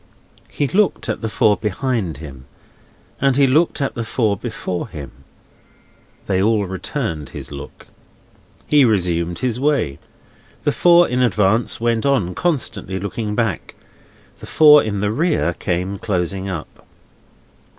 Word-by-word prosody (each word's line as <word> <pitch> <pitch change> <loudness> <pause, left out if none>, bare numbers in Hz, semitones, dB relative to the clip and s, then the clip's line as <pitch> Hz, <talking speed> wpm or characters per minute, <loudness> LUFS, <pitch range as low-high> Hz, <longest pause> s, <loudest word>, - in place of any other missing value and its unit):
He 145 - -1
looked 200 +5 +1
at - - -2
the 110 - -2
four 110 -1 +3
behind 105 - -2
him, 70 -4 -10 0.7
and 135 -1 +2
he 140 - +5
looked 155 +7 +2
at 140 - -1
the 115 - -4
four 110 -2 0
before 100 -3 -4
him. 75 -10 -9 1.1
They 95 -2 +1
all 105 0 +2
returned 95 - -4
his 65 -2 -8
look. 70 -1 -10 0.8
He 145 -2 +4
resumed 90 -6 +1
his 125 -1 -1
way. 135 - 0 0.6
The - - +2
four 175 0 +5
in 125 +1 0
advance 110 -1 +1
went 115 -1 0
on, 120 -11 +1
constantly 110 - -2
looking 105 +2 -4
back; 110 -5 -2 0.6
the - - -10
four 150 -2 +7
in 105 -2 -3
the 105 0 0
rear 150 - +1
came 90 +3 -3
closing 95 -1 -2
up. 85 -5 -7
105 Hz, 140 wpm, -19 LUFS, 90-130 Hz, 1.1 s, four